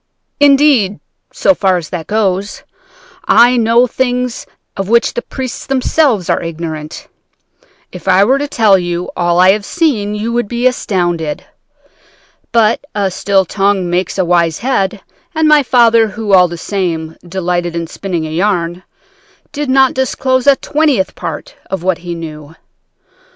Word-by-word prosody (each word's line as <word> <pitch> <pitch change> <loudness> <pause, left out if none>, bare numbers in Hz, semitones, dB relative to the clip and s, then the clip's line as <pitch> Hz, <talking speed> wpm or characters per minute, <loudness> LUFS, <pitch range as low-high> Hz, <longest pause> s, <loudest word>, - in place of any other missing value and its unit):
Indeed, 275 -8 +4 0.3
so 290 - +2
far 190 -7 +1
as 165 -3 -7
that 165 -3 -5
goes, 200 -2 -1 0.6
I 245 +1 +5
know 235 +1 +3
things 250 -1 -2 0.3
of 195 -1 -4
which 235 +1 +2
the 240 - -3
priests 255 -1 -6
themselves 260 - +1
are - - 0
ignorant. 160 -2 -6 0.8
If 180 0 -11
I 185 +1 +5
were 260 +6 +2
to 290 - -2
tell 215 -8 +3
you 175 0 -4
all 175 0 +1
I 185 +1 +6
have 205 +1 -1
seen, 215 - -1
you 220 +3 -3
would 240 -2 -1
be 240 +3 -3
astounded. 175 -10 -1 1.1
But 230 +1 +2
a 200 -2 0
still 195 +1 +1
tongue 195 -1 0
makes 180 +1 -1
a 185 - +1
wise 170 -2 +1
head, 210 -6 -1 0.3
and 315 0 +2
my 300 -1 +5
father, 230 -3 +4
who, 210 -1 -3
all 180 -1 +6
the 170 0 -7
same, 165 -4 -3
delighted 175 -1 -3
in 170 0 -2
spinning 175 -1 -4
a 155 - -6
yarn, 175 -1 -1 0.7
did 295 -2 -4
not 265 0 +4
disclose 260 0 -1
a 280 - +7
twentieth 290 -10 0
part - - -7
of 190 -3 -4
what 185 -2 0
he 175 -1 -6
knew. 155 -2 -9
200 Hz, 155 wpm, -14 LUFS, 175-245 Hz, 1.1 s, a